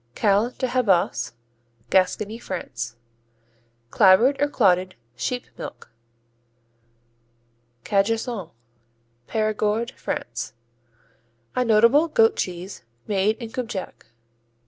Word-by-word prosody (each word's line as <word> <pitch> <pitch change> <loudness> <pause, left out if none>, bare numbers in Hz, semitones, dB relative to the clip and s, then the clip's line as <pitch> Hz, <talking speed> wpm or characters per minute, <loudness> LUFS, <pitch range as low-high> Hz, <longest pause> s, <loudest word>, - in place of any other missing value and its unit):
Caille 205 +2 +3
de 255 - 0
Habas 180 - +1 0.6
Gascony, 210 +4 +1
France 120 - -5 1.0
Clabbered 215 +8 +6
or 290 - +4
clotted 185 -8 +2 0.2
sheep 245 - -3
milk. - - -9 1.9
Cajassou 210 -1 0 0.8
Périgord, 215 +2 0
France 115 - -5 1.0
A 255 - +2
notable 235 +7 +5
goat 225 -8 +4
cheese 180 +1 -4 0.2
made 205 +2 +1
in 230 -3 -8
Cubjac. 225 - -5
210 Hz, 80 wpm, -24 LUFS, 185-235 Hz, 1.9 s, Clabbered